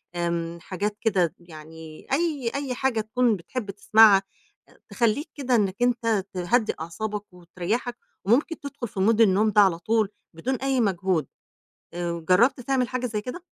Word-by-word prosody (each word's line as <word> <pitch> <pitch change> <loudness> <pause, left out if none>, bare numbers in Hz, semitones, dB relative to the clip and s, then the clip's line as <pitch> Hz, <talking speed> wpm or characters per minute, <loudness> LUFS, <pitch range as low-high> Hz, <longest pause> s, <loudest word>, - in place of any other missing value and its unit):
آمم 170 -1 -2
حاجات 205 +4 -3
كده 185 -7 +1
يعني 160 -1 -12
أي 290 -6 0
أي 275 -3 -3
حاجة 250 -3 0
تكون 230 +1 +1
بتحب 200 +4 -6
تسمعها 205 0 +5 0.5
آآ - - -23
تخلّيك 240 +6 0
كده 260 -4 0
إنَّك 195 -4 +1
أنت 230 -5 +1
تهدّي 200 +6 +1
أعصابك 205 +4 -5
وتريّحك 180 +8 -4 0.3
وممكن 260 - +2
تدخُل 280 -3 -6
في 200 - -8
mood 220 +4 +3
النوم 210 0 +4
ده 210 0 +5
على 185 -4 +3
طول 215 +3 +1 0.2
بدون 245 +12 -2
أي 265 0 0
مجهود، 185 - 0 0.7
آآ 170 -1 -4
جرّبت 235 +9 +4
تعمل 255 0 0
حاجة 255 0 -2
زي 215 -3 -3
كده؟ 250 +11 -7
215 Hz, 155 wpm, -25 LUFS, 180-245 Hz, 0.7 s, تسمعها